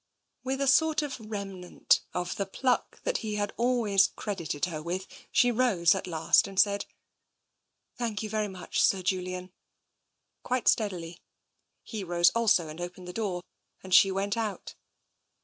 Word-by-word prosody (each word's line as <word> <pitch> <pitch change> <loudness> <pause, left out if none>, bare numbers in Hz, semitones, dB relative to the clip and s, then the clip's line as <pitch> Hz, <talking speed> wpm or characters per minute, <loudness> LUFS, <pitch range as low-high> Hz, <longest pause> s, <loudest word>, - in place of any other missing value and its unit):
With 265 +1 -2
a 275 - +1
sort 310 +3 +4
of 275 -3 -5
remnant 200 -4 -1
of 180 0 -3
the 200 - -2
pluck 250 +5 -1
that - - 0
he 215 -2 -4
had 205 -1 -2
always 230 -6 +3
credited 170 -7 -3
her 160 -4 -5
with, 180 +4 -3 0.3
she 245 0 +4
rose 220 -9 +3
at 190 -1 -4
last 165 +3 +3
and 195 -1 -4
said, 200 +1 +2 0.5
" - - -48
Thank 225 -3 -2
you - - -3
very 215 -1 0
much. 190 -2 -3
Sir 190 -2 +3
Julian," 185 0 -2 0.9
quite 255 -1 -2
steadily. 175 -6 0 0.6
He 215 -4 -6
rose 175 -1 +3
also 220 -8 +2
and 155 +3 -8
opened 175 +1 -7
the 180 - -7
door, 190 -5 -3 0.4
and 190 -1 -5
she 195 +1 +8
went 195 +1 -1
out. 220 -3 -4
195 Hz, 160 wpm, -28 LUFS, 180-225 Hz, 0.9 s, she